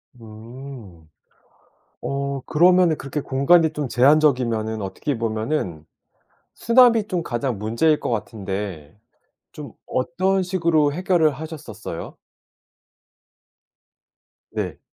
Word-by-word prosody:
음. 115 - -12 0.9
어 140 0 -3
그러면은 175 0 +4
그렇게 145 +2 -4
공간이 155 +5 +3
좀 150 -3 -3
제한적이면은 125 -6 +2
어떻게 115 +8 -3
보면은 110 - -3 0.7
수납이 230 -3 +4
좀 180 -3 -1
가장 120 -4 -3
문제일 115 +9 +1
거 - - -3
같은데 100 -7 -5 0.5
좀 - - -10
어떤 185 +8 0
식으로 165 -5 +1
해결을 175 -3 +2
하셨었어요? 155 +1 -8 2.3
네. - - -4
140 Hz, 215 characters per minute, -22 LUFS, 110-160 Hz, 2.3 s, 그러면은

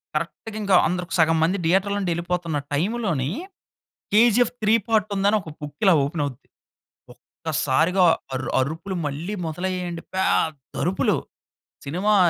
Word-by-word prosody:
కరెక్ట్‌గా 170 +7 -4
ఇంకా 200 -2 +3
అందరు 180 0 -2
సగం 160 0 +4
మంది 180 +5 +2
థియేటర్‌లో 195 +4 +2
నుంచి 185 -3 -1
వెళ్ళిపోతున్న 170 -2 -2 0.2
టైమ్‌లోని, 170 - 0 0.9
'కేజీఎఫ్ 235 +2 +5
3' 215 +2 +5
పార్ట్ 215 -2 +2
ఉందని 200 +2 +3
ఒక 160 - -9
బుక్ 145 -1 -8
ఇలా 190 - +7
ఓపెన్ 145 +1 -2
అవుద్ది. 130 -4 -9 0.7
ఒక్కసారిగా 180 +8 0 0.3
అరు 130 - -4
అరుపులు 160 +8 -3
మళ్ళీ 160 +9 -4
మొదలయ్యాయండి. 175 +1 -3
పెద్ద 160 -7 0
అరుపులు 180 +3 +1 0.7
సినిమా 185 +9 +1
180 Hz, 125 wpm, -23 LUFS, 160-200 Hz, 0.9 s, ఇలా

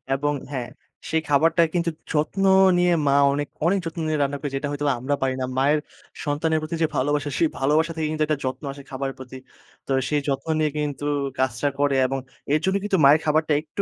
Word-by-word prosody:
এবং 145 +2 0 0.2
হ্যাঁ, 125 -3 -4 0.4
সেই 160 0 +1
খাবারটা 165 +4 +4
কিন্তু 170 -1 +1 0.2
যত্ন 155 +6 0 0.3
নিয়ে 175 0 +3
মা 140 - +4 0.2
অনেক, 145 0 -2 0.2
অনেক 195 +3 +3
যত্ন 165 0 -5
নিয়ে 155 -1 0
রান্না 140 +1 -2
করে 145 0 -4
যেটা 145 +2 -2
হয়তো 145 0 -3
আমরা 140 +3 -1
পারি 130 -1 0
না। - - 0
মায়ের 145 +3 +3 0.5
সন্তানের 155 +2 0
প্রতি 160 +2 -4
যে - - +3
ভালোবাসা 145 +2 0
সেই 165 - +3
ভালোবাসা 155 +5 +2
থেকে 160 -1 -1
কিন্তু 155 -1 0
একটা 155 -2 0
যত্ন 130 +4 -4
আসে 140 0 -12
খাবারের 135 0 -4
প্রতি। 130 0 -9 0.5
তো - - -4 0.2
সেই 150 -1 +1
যত্ন 135 +2 -2
নিয়ে 155 -1 +2
কিন্তু 145 -1 -3 0.3
কাজটা 130 +2 +1
করে। 145 -1 +2
এবং 135 +1 -2 0.4
এর 155 - +4
জন্য 190 +1 +1
কিন্তু 200 -2 +1
মায়ের 150 +3 +7
খাবারটা 155 0 +2
একটু 155 +6 -5
145 Hz, 205 wpm, -23 LUFS, 140-160 Hz, 0.5 s, মায়ের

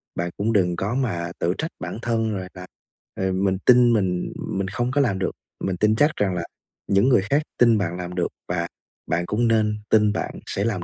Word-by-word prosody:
bạn 85 +1 -1
cũng 110 +3 0
đừng 90 -4 +2
có 100 +7 -2
mà 85 -10 -1
tự 85 +2 +1
trách 160 - -3
bản 110 - -5
thân, 115 -2 0
rồi 95 - -5
là, 90 0 -9 0.5
ờ, 95 0 -1
mình 95 0 +1
tin 120 -1 +6
mình, 90 -4 0
ừm, - - -4
mình 95 -1 -1
không 120 +6 -2
có 145 +1 +2
làm 105 -8 +1
được, 95 - 0 0.3
mình 95 -2 -1
tin 105 +2 +3
chắc 145 +6 +4
rằng 95 -3 0
là 85 - -2 0.4
những 100 +7 +3
người 125 - +5
khác 145 +2 +3 0.2
tin 115 -3 +5
bạn 90 -3 -2
làm 90 0 -6
được 90 - +1 0.2
và 85 -1 -1 0.4
bạn 85 +2 0
cũng 115 +6 +1
nên 110 -2 +2
tin 105 -1 +4
bạn - - -4
sẽ 100 - -2
làm 105 -6 -1
100 Hz, 225 wpm, -23 LUFS, 90-115 Hz, 0.5 s, tin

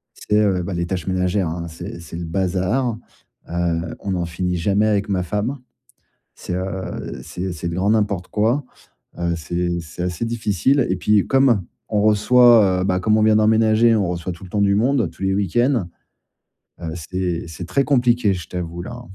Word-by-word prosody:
c'est, 105 0 0
heu, 95 -3 +1
bah, 95 - -4
les 85 0 -1
tâches 90 -3 -3
ménagères, 95 0 0
hein. 85 +1 -4
C'est 85 +1 -8
c'est 85 0 -8
le 85 - -4
bazar, 95 +7 0 0.5
heu, 85 -1 -1
on 95 -1 -3
en 90 -1 -1
finit 90 +2 -2
jamais 100 +5 +2
avec 105 -2 +1
ma 95 -2 0
femme. 105 +10 -2 0.8
C'est, 90 - -6
heu, 95 0 -5
c'est 90 +1 -5
c'est 85 0 -4
le 85 - -4
grand 95 +3 +1
n'importe 100 -4 0
quoi, 115 +7 +1 0.5
heu, 85 0 0
c'est 85 +2 -2
c'est 85 +1 -7
assez 90 +4 -2
difficile 115 - +1
et 95 - +1
puis 105 +2 +2
comme 135 -7 +3 0.3
on 105 -1 +1
reçoit, 110 -2 +5
heu, - - -1
bah, 95 -1 +1
comme 105 +3 +2
on - - +3
vient 110 0 +5
d'emménager, 110 +1 +4
on 100 -4 +1
reçoit 90 +1 -3
tout 85 - -12
le 90 - -12
temps 105 +1 0
du 100 0 +3
monde, 120 0 +2
tous 85 - -13
les 95 0 +1
week-ends. 105 +2 +1 0.9
Heu, 85 -2 -4
c'est 90 +1 -3
c'est 85 +2 -7
très 140 - +1
compliqué, 125 -6 +2
je 85 -4 -7
t'avoue 85 -1 -5
là. 120 +5 -8
95 Hz, 190 wpm, -21 LUFS, 85-110 Hz, 0.9 s, reçoit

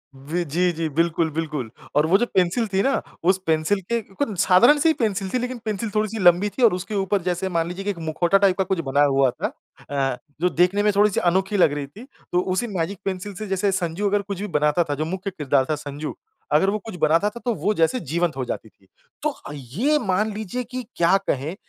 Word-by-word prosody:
वि 150 +6 -3
जी, 175 +4 +1
जी। 165 0 -2
बिल्कुल, 165 0 +2
बिल्कुल 150 -6 -3 0.3
और 150 - +4
वो 190 +4 +5
जो 240 - +1
पेंसिल 190 +5 +2
थी 190 - +3
ना, 275 - +1 0.2
उस 185 +2 +4
पेंसिल 160 +5 +2
के 235 - +1 0.4
साधारण 240 +11 +6
से 325 +2 +4
ही - - +4
पेंसिल 200 -4 0
थी। 255 - 0
लेकिन 250 +1 -3
पेंसिल 215 +1 -2
थोड़ी-सी 215 +1 0
लंबी 180 +4 +5
थी 255 - +1
और 225 - +6
उसके 195 +4 -4
ऊपर 195 0 0
जैसे 180 +1 -2
मान 165 -1 0
लीजिए 190 +3 -6
एक 190 - -8
मुखौटा 175 +4 +3
टाइप 195 -2 +3
का 190 - +2
कुछ 190 -2 -1
बना 145 +1 +4
हुआ 135 -2 +3
था - - -3 0.4
अ, 135 -3 0 0.2
जो 180 - +3
देखने 180 +5 +2
में 210 - +4
थोड़ी-सी 205 -1 +3
अनोखी 190 +3 +1
लग 165 -6 +4
रही 145 -1 -4
थी। 200 - -13 0.3
तो 175 - +3
उसी 190 +6 -1
मैजिक 170 +3 -2
पेंसिल 195 +1 -3
से 215 +2 -6
जैसे 195 +1 +1
संजू 185 +1 -1
अगर 205 0 +1
कुछ 200 -1 -6
भी 210 - -3
बनाता 150 -1 +2
था, 145 -3 -3
जो 155 - -2
मुख्य 190 +4 -4
किरदार 140 -5 +1
था 155 - +1
संजू 145 +1 -6 0.4
अगर 160 +6 +4
वो 210 - 0
कुछ 220 -5 -7
बनाता 165 +7 +3
था 235 - -10
तो 240 - +1
वो 195 +5 0
जैसे 165 +7 +2
जीवंत 170 - -1
हो 130 - -1
जाती 110 - -5
थी। 95 - -31 0.4
तो 305 - +2
अ, 280 - -10
ये 155 - 0
मान 210 -1 0
लीजिए 220 +4 -4
कि 255 +2 -6
क्या 170 +2 +4
कहें 140 +6 -1
185 Hz, 230 wpm, -23 LUFS, 160-205 Hz, 0.4 s, साधारण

